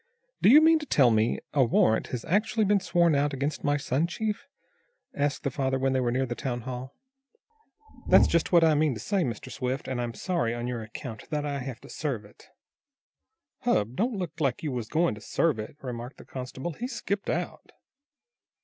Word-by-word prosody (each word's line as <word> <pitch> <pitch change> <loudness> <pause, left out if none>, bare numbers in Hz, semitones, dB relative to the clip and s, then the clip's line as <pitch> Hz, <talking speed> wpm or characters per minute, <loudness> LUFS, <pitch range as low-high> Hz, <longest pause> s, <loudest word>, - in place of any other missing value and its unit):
"Do - - +6
you 295 +6 +9
mean 320 0 +6
to 300 - -8
tell 130 - +5
me 110 +1 +2 0.2
a 140 -3 +4
warrant 110 -2 +3
has 125 -2 -5
actually 215 +4 +1
been 200 0 +3
sworn 175 -3 +2
out 145 0 +1
against 140 +3 -2
my 145 0 +2
son, 145 +3 0
Chief?" 215 +4 -3 0.7
asked 145 0 -1
the 140 - -1
father, 135 0 0
when 135 0 +1
they 130 - +2
were 125 -2 +1
near 130 +2 +1
the 120 - -3
town 120 -1 -3
hall. 130 +2 -6 1.1
"That's - - +7
just 170 -1 +1
what 170 -2 +6
I 160 -1 +5
mean 150 -3 +2
to - - -7
say, 195 - 0
Mr. 115 -7 -5
Swift, 130 +1 -3
and, 130 -2 -2
I'm 120 -1 -4
sorry, 165 -11 -1
on 120 0 -4
your 120 -2 -3
account, 110 +1 -8
that 150 -1 -1
I 140 -1 -2
have 130 -2 -6
to - - -13
serve 130 -9 -3
it." 105 - -18 1.1
"Hub! 105 +4 +1
Don't 230 - 0
look 170 -3 -5
like 135 -1 0
you 150 - -1
was 120 -3 -3
goin' 165 +4 +1
to 105 - -10
serve 150 +3 +1
it," 110 +6 -7
remarked 125 0 -6
the - - -13
constable. 130 +5 -6
"He's 245 - -5
skipped 200 0 -3
out." - - -3
135 Hz, 205 wpm, -27 LUFS, 120-165 Hz, 1.1 s, you